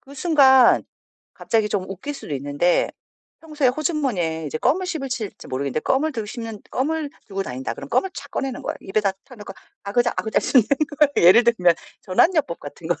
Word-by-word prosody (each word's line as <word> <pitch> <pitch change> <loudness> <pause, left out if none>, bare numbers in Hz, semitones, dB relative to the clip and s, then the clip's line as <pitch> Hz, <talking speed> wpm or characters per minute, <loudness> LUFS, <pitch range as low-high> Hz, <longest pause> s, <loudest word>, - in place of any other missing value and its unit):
그 275 - -16
순간 265 -5 +5 0.5
갑자기 220 -2 0
좀 195 -3 -1
웃길 195 +10 -6
수도 155 - -6
있는데 145 +6 +1 0.5
평소에 300 -5 0
호주머니에 250 - -1
이제 155 - -4
껌을 330 - +1
씹으실지 265 - -5
모르겠는데 140 +3 -2
껌을 300 - 0
드시면 225 -2 -6
껌을 300 +2 -1 0.2
들고 195 -1 -3
다닌다 130 -4 -5
그러면 140 - -9
껌을 385 - +1
착 - - -9
꺼내는 265 -2 -3
거예요. - - -4
입에다 195 0 0
딱 250 -4 -15
넣고 205 -2 -9 0.3
아그작아그작 225 +1 0
씹는 245 -6 +4 0.3
거예요. 285 - +4
예를 235 +6 +7
들면 180 -8 +4 0.3
전환 260 - +3
요법 280 - -1
같은 145 +3 -10
거를 175 - -1
230 Hz, 405 characters per minute, -22 LUFS, 180-280 Hz, 0.5 s, 예를